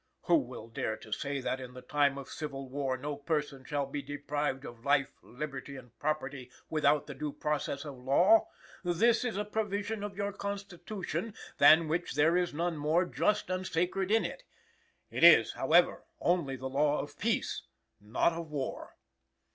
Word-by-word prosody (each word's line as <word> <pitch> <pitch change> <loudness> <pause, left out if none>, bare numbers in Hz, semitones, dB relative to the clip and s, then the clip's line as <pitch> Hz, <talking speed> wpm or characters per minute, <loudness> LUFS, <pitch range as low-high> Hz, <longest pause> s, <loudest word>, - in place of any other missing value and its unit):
"Who - - +5
will 115 - -7
dare 110 -1 -3
to 110 - -14
say 140 +4 -2
that 130 +1 -2
in 125 0 -9
the 125 - -9
time 140 +1 +2
of 140 - -7
civil 135 -3 -6
war 135 -1 -2
no 145 +3 -4
person 145 -2 -2
shall 145 +1 -1
be 140 +1 -4
deprived 145 -1 -3
of 120 -1 -10
life, 140 -1 +2
liberty 140 +1 -6
and 125 -3 -12
property, 140 -4 -2 0.2
without 150 -1 +3
due 150 +1 -5
process 150 0 -2
of 140 -4 -8
law? 155 - +5 0.4
This 220 +8 +3
is 240 -5 -2
a 210 - -1
provision 210 0 -2
of 200 -2 -5
your 200 0 -2
Constitution, 200 +1 -5 0.2
than 160 +1 +7
which 165 +3 -2
there 160 +3 +4
is 180 -1 +1
none 170 +2 -1
more 155 +5 +2
just 210 +2 0
and 185 0 -2
sacred 180 +3 0
in 225 +1 +3
it; - - -5 0.7
it - - -2
is, - - +8
however, - - +3 0.2
only 170 - +1
the 130 0 -8
law 145 +3 +2
of 145 0 -7
peace, 225 +3 0 0.4
not 105 +11 +1
of 165 -1 -6
war. 140 -3 -4
150 Hz, 170 wpm, -31 LUFS, 135-180 Hz, 0.7 s, is